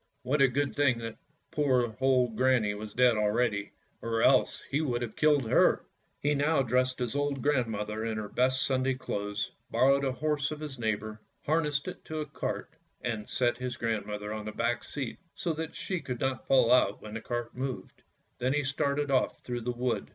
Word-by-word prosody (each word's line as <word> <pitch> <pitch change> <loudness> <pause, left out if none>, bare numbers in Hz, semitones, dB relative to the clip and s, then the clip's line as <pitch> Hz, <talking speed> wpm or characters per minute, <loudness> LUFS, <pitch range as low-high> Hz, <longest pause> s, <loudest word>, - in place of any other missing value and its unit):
What 140 +3 +1
a 135 - +8
good 140 +2 -1
thing 140 -4 +3
that 115 -1 -6 0.3
poor 125 -6 +2
old 125 -3 +3
granny 125 -4 +3
was 105 0 -8
dead 125 -2 +5
already, 105 -1 +1 0.3
or 115 -1 0
else 130 -1 +4
he 145 +3 +2
would 120 -5 -1
have 115 -3 -6
killed 145 -5 +3
her." - - +4 0.3
He 145 +1 +1
now 145 0 +2
dressed 130 +1 +1
his 125 +1 -2
old 145 -2 -1
grandmother 110 -6 0
in 110 -1 -2
her 105 -1 -3
best 130 +4 +2
Sunday 130 0 +1
clothes, 105 -5 -3 0.2
borrowed 140 +1 +4
a 135 - +1
horse 150 +1 0
of 155 - -5
his 145 -4 -7
neighbour, 110 -1 -2 0.2
harnessed 150 -1 +1
it 180 - -7
to 155 - -5
a 155 - -2
cart, - - -4 0.3
and 110 -3 -3
set 120 -1 +1
his 125 -1 -4
grandmother 105 -2 -2
on 110 -1 -5
the 110 - -4
back 120 +2 -1
seat, 135 -5 -5 0.2
so 175 -4 -1
that 160 0 -5
she 185 -3 -3
could 125 -2 -5
not 130 -3 -2
fall 130 -3 +5
out 125 -5 +4
when 105 0 -8
the 115 - -4
cart 120 0 -4
moved. 130 0 -5 0.4
Then 130 +2 +1
he 150 0 +1
started 140 +1 0
off 130 - +1
through 120 -1 -3
the 125 +2 -1
wood. 120 0 -2
125 Hz, 195 wpm, -30 LUFS, 115-140 Hz, 0.4 s, a